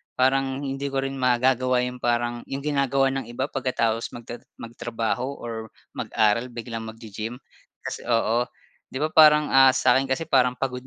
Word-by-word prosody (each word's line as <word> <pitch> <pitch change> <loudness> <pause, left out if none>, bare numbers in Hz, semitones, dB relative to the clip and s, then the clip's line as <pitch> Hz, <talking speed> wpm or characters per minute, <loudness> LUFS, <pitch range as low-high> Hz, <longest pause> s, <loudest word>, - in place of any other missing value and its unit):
parang 135 +1 +1
hindi 135 0 -4
ko 135 - 0
rin 135 0 -4
magagawa 125 0 +2
yung 125 0 -3
parang 120 0 -1
yung 135 +1 -5
ginagawa 140 -2 +1
ng 135 0 -3
iba 130 +4 -3
pagkatapos 115 -4 -1
magta 120 0 -8 0.2
magtrabaho 115 +1 -3
or 110 -2 -6 0.3
mag-aral 110 +2 +1
biglang 115 -2 -6
maggi-gym. 110 +1 -7 0.5
Kasi - - -6
oo, 115 0 +2 0.5
'di 130 - -5
ba, 155 - +1
parang, 150 -1 +6
ah, 135 0 +7
sa'kin 130 +1 +3
kasi 130 +5 -1
parang 125 -2 +4
pagod 125 -1 -3
125 Hz, 155 wpm, -24 LUFS, 120-135 Hz, 0.5 s, ah